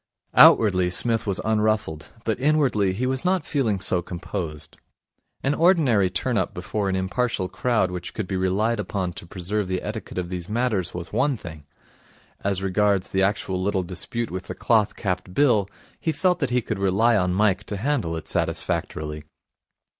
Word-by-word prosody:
Outwardly 95 -5 +6
Psmith 115 +5 0
was 100 -1 -1
unruffled, 110 -8 0
but 110 +1 -1
inwardly 135 -9 +2
he 120 +7 -2
was 130 0 0
not 180 -3 +1
feeling 115 -10 0
so 90 -1 0
composed. 85 -3 -6 0.7
An 135 - +2
ordinary 145 - +4
turn 90 - 0
up - - -2
before 105 -2 -2
an 95 - 0
impartial 95 +1 -1
crowd 105 0 0
which 90 -1 -6
could 110 - -2
be 95 - -3
relied 100 +5 +1
upon 95 -4 -2
to 85 - -10
preserve 95 +3 -2
the 95 0 -2
etiquette 110 -2 -6
of 90 -1 -2
these 90 0 -5
matters 110 -7 -1
was 90 0 -6
one 140 -2 +1
thing. 80 -7 -10 0.8
As 95 -1 0
regards 100 0 +1
the 95 - 0
actual 95 -1 0
little 95 -1 0
dispute 115 +6 -3
with 95 +1 -5
the - - -6
cloth 110 -3 +2
capped 90 -2 -3
Bill, 110 -9 +3 0.3
he 160 - 0
felt 180 +3 +1
that 135 -5 0
he 125 -1 +1
could 110 -3 -3
rely 100 +5 +3
on 90 -3 +1
Mike 105 -1 +2
to 100 - -4
handle 115 - -1
it 80 - -7
satisfactorily. 75 0 -2
100 Hz, 175 wpm, -24 LUFS, 90-115 Hz, 0.8 s, Outwardly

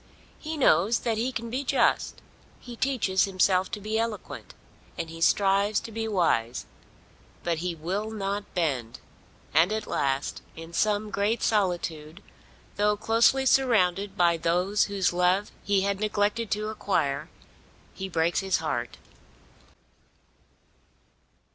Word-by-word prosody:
He 315 0 -5
knows 235 -4 +3
that 225 -2 -1
he 250 +3 0
can 235 -2 -5
be 260 +3 -2
just, 275 0 +1 0.4
he 240 -1 -10
teaches 225 -8 +1
himself 185 -1 +2
to - - -5
be 215 +2 -2
eloquent, 225 -2 -5 0.4
and 160 - -4
he 165 0 -9
strives 200 +3 +3
to 225 - -9
be 225 0 -3
wise. 130 - 0 0.8
But 170 -2 -1
he 175 0 -3
will 190 +7 -3
not 200 -1 -4
bend; 135 -8 -1 0.5
and 170 +5 +4
at 220 0 -2
last, 135 0 -1
in 165 +1 -10
some 210 +3 0
great 205 +4 0
solitude, 175 -5 -1 0.5
though 210 0 +2
closely 230 +5 +3
surrounded 205 -8 +2
by 170 -1 +4
those 180 +5 +1
whose 195 -3 0
love 180 +3 +1
he 200 -2 +1
had 200 0 -1
neglected 210 +1 0
to 210 +2 -1
acquire, 160 -10 -1 0.6
he 190 0 -6
breaks 165 -1 +1
his 190 -2 +1
heart. 120 -7 -3
200 Hz, 130 wpm, -27 LUFS, 170-215 Hz, 0.8 s, and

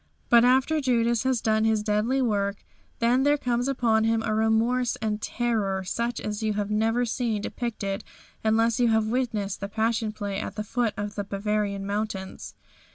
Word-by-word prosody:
But 235 -1 +7
after 265 +5 +3
Judas 235 -3 +2
has 260 -3 +1
done 220 0 +2
his 220 -1 +2
deadly 220 +6 +1
work 200 -3 -1 0.3
then 240 +3 +3
there 290 +2 +3
comes 245 -2 -1
upon 230 -5 +2
him 225 0 +1
a 215 - -1
remorse 225 +3 +2
and 215 -1 -3
terror 215 -6 -1
such 235 +6 -2
as 210 0 -4
you 215 -1 0
have 205 0 -2
never 225 +3 +1
seen 230 -2 -1
depicted 210 -6 -3 0.4
unless 225 +2 +2
you 245 - +4
have 220 -1 +3
witnessed 220 -5 -1
the 200 - -5
Passion 225 0 0
Play 205 -2 -4
at - - -5
the 210 - -3
foot 230 0 -1
of 205 0 -4
the 205 - -3
Bavarian 200 0 -2
mountains. 200 -2 -4
220 Hz, 175 wpm, -26 LUFS, 210-240 Hz, 0.4 s, But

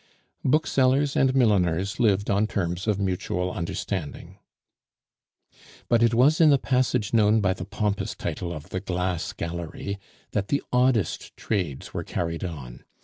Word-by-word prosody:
Booksellers 140 -1 +2
and 130 0 +3
milliners 100 -6 +2
lived 100 -4 +2
on 100 +2 +2
terms 90 -1 -2
of 105 -2 +1
mutual 90 -1 -1
understanding. 85 -2 -5 1.5
But 120 -1 +4
it 115 0 +4
was 145 +7 +4
in 160 - +7
the 140 - +6
passage 125 -5 0
known 110 -1 +4
by 95 -3 +2
the 90 - -7
pompous 100 0 -2
title 85 +1 -4
of 75 -3 -8
the 95 - -3
"Glass 90 -2 -2
Gallery" 85 +4 -5 0.3
that 100 -1 -1
the 140 - 0
oddest 125 -7 +1
trades 90 -11 -3
were - - -3
carried 85 0 -3
on. 70 -9 -7
100 Hz, 145 wpm, -25 LUFS, 90-120 Hz, 1.5 s, in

